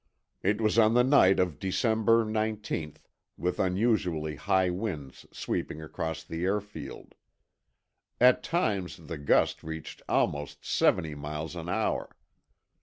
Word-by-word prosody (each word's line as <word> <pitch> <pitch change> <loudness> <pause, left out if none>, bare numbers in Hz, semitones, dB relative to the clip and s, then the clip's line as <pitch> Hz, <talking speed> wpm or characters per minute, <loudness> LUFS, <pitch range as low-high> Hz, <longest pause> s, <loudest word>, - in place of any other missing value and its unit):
It 105 +3 +1
was 110 +1 +2
on 110 +1 +5
the 125 - +6
night 125 -8 +5
of 90 -5 0
December 110 +3 +2
1918, 110 -7 -2 0.4
with 90 +1 -2
unusually 90 -6 +1
high 95 +5 +1
winds 90 -9 -5
sweeping 75 - -3
across 80 +1 -4
the 80 +1 -5
airfield. 100 -7 -4 1.1
At 125 +1 +6
times 105 - -1
the 80 -1 -8
gusts 70 - +2
reached 80 0 -7
almost 75 0 -1
seventy 80 -2 +2
miles 75 +3 -5
an 85 0 -6
hour. - - -1
90 Hz, 120 wpm, -29 LUFS, 80-110 Hz, 1.1 s, the